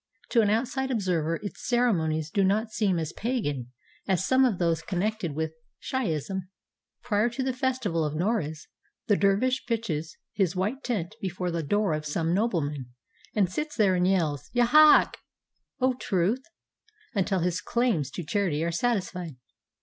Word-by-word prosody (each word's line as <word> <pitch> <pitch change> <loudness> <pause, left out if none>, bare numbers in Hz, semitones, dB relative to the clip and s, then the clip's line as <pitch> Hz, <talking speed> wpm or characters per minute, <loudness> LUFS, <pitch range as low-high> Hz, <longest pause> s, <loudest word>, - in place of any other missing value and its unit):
To 235 - +4
an 210 - +2
outside 265 +4 0
observer 180 -9 0
its 205 - -6
ceremonies 160 -11 +1
do 200 - +2
not 215 +4 +1
seem 200 -5 +1
as 160 0 -3
"pagan" 145 - -2 0.4
as 190 -1 +1
some 260 0 +4
of 225 -7 +1
those 165 -2 +1
connected 185 -1 -2
with 160 0 -2 0.3
Shiahism. 190 - -2 0.5
Prior 220 -1 +2
to 260 +3 -3
the 260 0 0
festival 250 -10 0
of 150 0 -2
Noruz 165 -4 -1 0.4
the 205 - +3
dervish 205 +7 +2
pitches 185 -10 -2 0.2
his 190 -3 +1
white 210 +10 -2
tent 210 -6 -2
before 180 -2 -2
the 170 0 -1
door 205 +3 +1
of 155 0 -3
some 165 +3 0
nobleman, 155 - 0 0.5
and 205 -4 +3
sits 300 - -4
there 205 -5 +4
and 180 0 +2
yells, 155 -7 0
"Ya 245 -1 +4
hak!" 305 +5 +6 0.6
("O 260 0 +3
truth!") 205 0 0 0.7
until 195 -2 +1
his 180 +1 0
claims 230 - 0
to 175 - -6
charity 165 -3 0
are 170 - 0
satisfied. 180 - -1
190 Hz, 155 wpm, -27 LUFS, 165-230 Hz, 0.7 s, hak